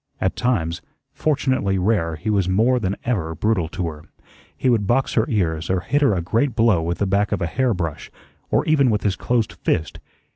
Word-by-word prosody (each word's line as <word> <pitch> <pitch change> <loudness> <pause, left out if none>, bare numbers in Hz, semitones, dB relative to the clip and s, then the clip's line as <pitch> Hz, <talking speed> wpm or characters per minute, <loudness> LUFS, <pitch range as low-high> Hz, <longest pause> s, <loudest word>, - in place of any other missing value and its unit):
At 95 - 0
times 90 -9 -1 0.3
fortunately 130 -10 0
rare 90 -4 +1
he 90 +7 -3
was 100 -3 +1
more 115 +7 +3
than 100 -3 -1
ever 85 -10 -2
brutal 95 -2 0
to 90 +1 -4
her. 75 -2 -7 0.5
He - - -1
would 115 -5 +2
box 130 +4 +1
her 110 - +2
ears 85 - -1
or 95 -1 +1
hit 145 +9 0
her 135 -9 +3
a 85 - -2
great 115 +9 0
blow 110 -7 +3
with 85 +2 -2
the 100 - 0
back 100 +2 +1
of - - 0
a 85 - -1
hair 125 +4 0
brush, 85 -4 -4 0.4
or - - +1
even 145 -5 +3
with 105 -2 0
his 100 -3 +1
closed 120 +1 -1
fist. 80 - -2
100 Hz, 210 wpm, -21 LUFS, 85-120 Hz, 0.5 s, more